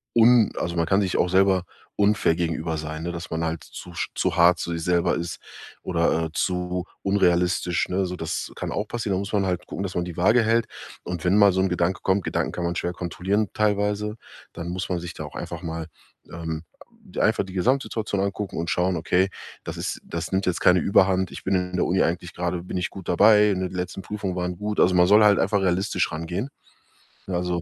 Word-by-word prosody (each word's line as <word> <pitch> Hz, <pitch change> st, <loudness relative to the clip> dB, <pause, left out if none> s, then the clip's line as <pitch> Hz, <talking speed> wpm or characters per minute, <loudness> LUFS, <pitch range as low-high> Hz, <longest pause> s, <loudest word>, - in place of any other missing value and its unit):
un 115 Hz, -1 st, +6 dB
also, 85 Hz, 0 st, -2 dB
man 85 Hz, -, +2 dB
kann 95 Hz, +5 st, +2 dB
sich 95 Hz, -3 st, 0 dB
auch 90 Hz, -, +2 dB
selber 95 Hz, 0 st, +3 dB, 0.3 s
unfair 105 Hz, -5 st, +3 dB
gegenüber 80 Hz, -1 st, -2 dB
sein, 80 Hz, +1 st, -5 dB
ne? 85 Hz, -, -3 dB
Dass 85 Hz, 0 st, -7 dB
man 80 Hz, 0 st, -1 dB
halt 80 Hz, -1 st, -3 dB
zu 90 Hz, -, -10 dB
sch -, -, -3 dB
zu -, -, 0 dB
hart 85 Hz, +1 st, +5 dB
zu 85 Hz, -, -3 dB
sich 85 Hz, -1 st, -3 dB
selber 90 Hz, 0 st, +2 dB
ist 85 Hz, -1 st, -5 dB, 0.4 s
oder, 85 Hz, -2 st, +1 dB
äh, -, -, -4 dB
zu 90 Hz, 0 st, -1 dB, 0.2 s
unrealistisch, 90 Hz, -2 st, +1 dB
ne? 95 Hz, +1 st, 0 dB
So 90 Hz, -, -4 dB
das 80 Hz, 0 st, -4 dB
kann -, -, -4 dB
auch 105 Hz, +1 st, -2 dB
passieren. 110 Hz, -5 st, -2 dB
Da -, -, 0 dB
muss 100 Hz, +2 st, -5 dB
man 100 Hz, -2 st, +2 dB
halt 90 Hz, -1 st, -2 dB
gucken, 95 Hz, -, -4 dB
dass 95 Hz, -2 st, -5 dB
man 90 Hz, 0 st, 0 dB
die 85 Hz, -, -7 dB
Waage 110 Hz, +6 st, +4 dB
hält. 115 Hz, +1 st, +2 dB, 0.4 s
Und 90 Hz, -2 st, -5 dB
wenn 95 Hz, +4 st, +4 dB
mal 100 Hz, -1 st, +7 dB
so 95 Hz, -, 0 dB
'n 95 Hz, -, +2 dB
Gedanke 90 Hz, +1 st, 0 dB
kommt, 95 Hz, 0 st, +2 dB
Gedanken -, -, -1 dB
kann 90 Hz, -, -3 dB
man 85 Hz, 0 st, -1 dB
schwer 90 Hz, +1 st, -2 dB
kontrollieren, 95 Hz, +4 st, -1 dB
teilweise, 105 Hz, 0 st, 0 dB, 0.4 s
dann 85 Hz, +1 st, -6 dB
muss 90 Hz, +1 st, -3 dB
man 90 Hz, -2 st, -1 dB
sich 85 Hz, 0 st, -7 dB
da -, -, -7 dB
auch -, -, -11 dB
einfach 85 Hz, +1 st, -6 dB
mal, 80 Hz, -1 st, -4 dB, 0.4 s
ähm 80 Hz, -1 st, -5 dB, 0.6 s
einfach -, -, +2 dB
die 95 Hz, -, -10 dB
Gesamtsituation 110 Hz, 0 st, 0 dB
angucken 100 Hz, 0 st, -3 dB
und 85 Hz, +1 st, -2 dB
schauen, 90 Hz, +1 st, +1 dB
okay, 90 Hz, +4 st, +2 dB, 0.3 s
das -, -, -6 dB
ist -, -, -3 dB
das 85 Hz, +2 st, -5 dB
nimmt 95 Hz, 0 st, +1 dB
jetzt 90 Hz, -, 0 dB
keine 90 Hz, 0 st, +5 dB
Überhand. 95 Hz, -1 st, +3 dB
Ich -, -, -9 dB
bin 95 Hz, -, 0 dB
in 90 Hz, 0 st, -1 dB
der 90 Hz, -, +1 dB
Uni 95 Hz, +1 st, +2 dB
eigentlich 85 Hz, +1 st, -2 dB
gerade 90 Hz, 0 st, -2 dB
bin 90 Hz, -, -5 dB
ich 90 Hz, -, -1 dB
gut 95 Hz, -3 st, -10 dB
dabei, 105 Hz, +3 st, +6 dB
in 95 Hz, -, -1 dB
den 95 Hz, -, -2 dB
letzten 90 Hz, +1 st, -4 dB
Prüfungen 100 Hz, -2 st, -4 dB
waren 90 Hz, -1 st, -3 dB
gut. 105 Hz, +1 st, -3 dB
Also, 90 Hz, +1 st, +4 dB
man 90 Hz, 0 st, +6 dB
soll 105 Hz, +3 st, +6 dB
halt 105 Hz, -1 st, +6 dB
einfach 100 Hz, +1 st, +2 dB
realistisch 95 Hz, +1 st, 0 dB
rangehen. 85 Hz, -, -4 dB, 0.8 s
Ne, 95 Hz, -, -2 dB
also 90 Hz, -1 st, -1 dB
90 Hz, 225 wpm, -24 LUFS, 85-100 Hz, 0.8 s, mal